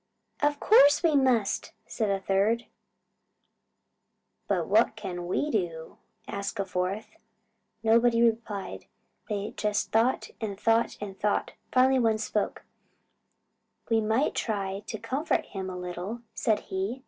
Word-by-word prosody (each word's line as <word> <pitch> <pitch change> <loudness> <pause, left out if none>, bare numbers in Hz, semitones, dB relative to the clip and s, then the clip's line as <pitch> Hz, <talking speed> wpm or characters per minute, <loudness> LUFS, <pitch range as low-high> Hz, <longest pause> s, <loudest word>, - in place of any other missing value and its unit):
"Of 290 0 +2
course 290 -9 +6
we 325 -3 +4
must," 255 -7 +2
said 220 -3 -2
a 195 -1 +1
third. 200 +5 +1 1.8
"But - - 0
what - - +3
can 175 -1 -5
we 295 +11 0
do?" 170 -6 -3 0.3
asked 200 0 -4
a 195 - 0
fourth. 185 +3 -3 0.7
Nobody 230 +1 +4
replied. 225 -4 -1 0.4
They 205 -1 -3
just 210 -1 -1
thought 230 +4 +2
and 200 -3 -4
thought 225 +1 +2
and 195 -2 -7
thought. 210 0 0 0.2
Finally 260 +1 +4
the - - +2
first 225 -1 +4
one - - -2 0.3
spoke. - - -16 1.3
"We 225 -1 +4
might 220 +7 +1
try 195 -3 -2
to 220 - -4
comfort 260 +9 -1
him 190 -2 -5
a 180 - -6
little," 180 +6 -5
said 215 -2 +1
he. 195 +7 -3
215 Hz, 135 wpm, -28 LUFS, 195-235 Hz, 1.8 s, course